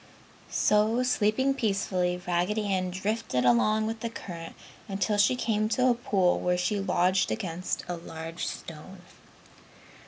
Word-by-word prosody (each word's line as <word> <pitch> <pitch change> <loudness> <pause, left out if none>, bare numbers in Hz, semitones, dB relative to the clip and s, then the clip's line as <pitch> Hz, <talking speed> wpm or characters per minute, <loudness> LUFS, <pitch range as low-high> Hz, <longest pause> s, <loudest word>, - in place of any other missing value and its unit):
So, 215 +4 +2
sleeping 250 +2 +2
peacefully, 190 -7 0
Raggedy 180 +5 0
Ann 185 -1 0
drifted 190 - -1
along 215 - +3
with 225 +1 -3
the 230 - -3
current 170 -7 -8 0.3
until 200 +1 0
she 205 +5 +4
came 215 -3 0
to 255 +3 +3
a - - +4
pool 195 -6 +1
where 180 0 +1
she 180 +3 0
lodged 185 0 +2
against 165 - -3
a 175 - -3
large 165 0 -6
stone. 165 +4 -8
195 Hz, 135 wpm, -28 LUFS, 180-220 Hz, 0.3 s, she